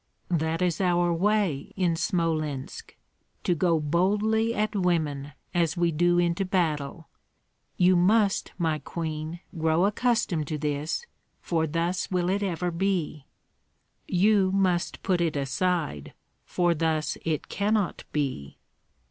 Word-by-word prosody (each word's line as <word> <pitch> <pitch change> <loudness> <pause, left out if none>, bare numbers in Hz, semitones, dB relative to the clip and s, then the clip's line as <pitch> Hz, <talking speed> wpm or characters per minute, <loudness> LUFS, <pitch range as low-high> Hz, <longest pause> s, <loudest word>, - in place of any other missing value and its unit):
"That 165 +1 0
is 180 0 0
our 175 -1 +2
way 190 -5 0
in 180 -3 +1
Smolensk, 160 -7 -2 0.5
to 180 - +2
go 170 0 +2
boldly 205 +8 +1
at 215 +1 0
women 155 -7 0 0.2
as 170 -2 +1
we 170 -1 +2
do 175 +3 +2
into 175 +2 +1
battle. 165 -5 -1 0.7
You 180 0 +5
must, 200 +3 +3
my 160 -4 0
queen, 160 +2 -5
grow 160 +2 +2
accustomed 210 - +1
to 155 - -2
this, 150 - -2 0.3
for 160 -2 0
thus 170 +4 -1
will 180 -1 0
it 200 +1 0
ever 180 -2 -1
be." 170 -5 -1 0.8
"You 195 +1 +3
must 185 -3 0
put 185 -3 +1
it 165 -3 0
aside, 140 - -1 0.3
for 175 -1 +1
thus 155 -1 -1
it 160 -2 -2
cannot 205 -1 0
be." 135 - -3
170 Hz, 125 wpm, -27 LUFS, 155-185 Hz, 0.8 s, You